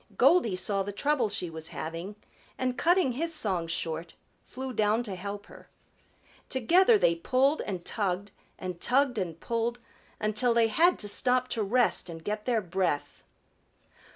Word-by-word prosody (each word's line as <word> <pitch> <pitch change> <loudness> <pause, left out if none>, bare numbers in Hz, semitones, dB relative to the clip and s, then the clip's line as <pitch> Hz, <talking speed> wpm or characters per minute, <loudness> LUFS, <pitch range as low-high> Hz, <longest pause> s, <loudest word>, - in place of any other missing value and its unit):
Goldy 235 - +4
saw 195 +2 -1
the 200 +1 -3
trouble 255 +1 +1
she 200 -3 -3
was 160 0 -7
having 165 +7 -6 0.4
and 255 -1 -1
cutting 345 -2 +3
his 325 +6 -1
song 190 - -1
short, 165 0 -4 0.3
flew 260 0 -7
down 215 +1 +2
to 210 -5 -5
help 200 +2 -6
her. - - -15 0.8
Together 355 - +4
they 170 - +3
pulled 260 - +1
and 185 -4 -5
tugged 200 -1 -2 0.3
and 180 -2 -6
tugged 255 -2 +2
and 170 -4 -4
pulled, 235 +1 -1 0.4
until 215 +3 +1
they 230 -1 +4
had 340 +10 +4
to 205 - -3
stop 250 +4 +1
to 225 - -2
rest 220 -2 +2
and 165 -1 -8
get 210 +2 -3
their 235 -3 +1
breath. 180 -5 -2
215 Hz, 155 wpm, -28 LUFS, 185-255 Hz, 0.8 s, Goldy